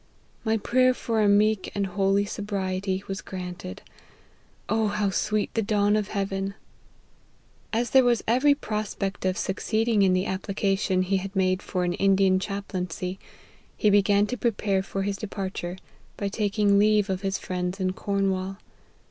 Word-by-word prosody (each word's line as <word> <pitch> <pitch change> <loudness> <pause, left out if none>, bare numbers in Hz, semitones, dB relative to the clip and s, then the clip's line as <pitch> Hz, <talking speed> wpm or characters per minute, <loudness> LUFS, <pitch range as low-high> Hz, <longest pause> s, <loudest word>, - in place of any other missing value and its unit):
My 225 0 +1
prayer 255 +4 +3
for 225 -3 -1
a 205 - +4
meek 210 0 +3
and 200 -1 0
holy 195 +1 +1
sobriety 195 -2 -2
was 195 +1 -4
granted. 180 - -7 0.8
O 220 +3 +1
how 205 -1 0
sweet 210 +2 0
the 225 - +1
dawn 205 -1 +2
of 210 -2 0
heaven 195 -1 -2 0.6
!"' - - -35
As 235 +2 0
there 265 -1 +7
was 240 -2 +2
every 260 +5 +4
prospect 210 -6 -3
of 185 0 +1
succeeding 220 +2 0
in 190 -2 +4
the 185 +1 +1
application 195 0 0
he 195 +1 +1
had 195 +1 -6
made 185 0 +2
for 180 -2 -2
an 175 0 0
Indian 195 0 +3
chaplaincy, 190 -2 -4 0.6
he 210 - +3
began 205 0 +4
to 250 +4 -4
prepare 205 -4 0
for 195 0 -3
his 200 0 -2
departure, 190 -4 -5 0.4
by 200 - -2
taking 205 -1 +2
leave 210 -1 +4
of 190 -2 -2
his 195 -1 -1
friends 180 +1 -3
in 185 -1 0
Cornwall. 195 -1 -1
200 Hz, 155 wpm, -26 LUFS, 190-210 Hz, 0.8 s, there